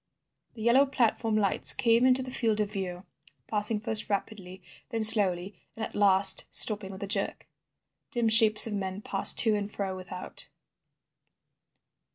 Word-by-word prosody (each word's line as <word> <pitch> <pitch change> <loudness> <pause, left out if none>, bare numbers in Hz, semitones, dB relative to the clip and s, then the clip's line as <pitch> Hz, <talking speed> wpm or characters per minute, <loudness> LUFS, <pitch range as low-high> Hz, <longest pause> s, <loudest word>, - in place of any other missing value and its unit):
The 220 - -10
yellow 255 +4 +2
platform 230 -4 -2
lights 200 -2 +2
came 235 +1 0
into 260 0 0
the 255 - -10
field 225 -4 -3
of 210 -1 -4
view, 185 -3 -8 0.4
passing 210 0 -3
first 220 0 -4
rapidly, 190 -2 -7 0.3
then 225 -3 -4
slowly, 200 -4 +3 0.2
and 220 - -6
at - - -13
last 195 -1 +5
stopping 205 -3 +2
with 190 +1 -11
a - - -7
jerk. 200 - -4 0.6
Dim 240 -4 -3
shapes 220 -1 +4
of 225 - -7
men 195 0 -7
passed 195 - +1
to 220 -2 -1
and 205 0 -5
fro 195 -2 -6
without. 185 0 -11
210 Hz, 155 wpm, -25 LUFS, 195-225 Hz, 0.6 s, last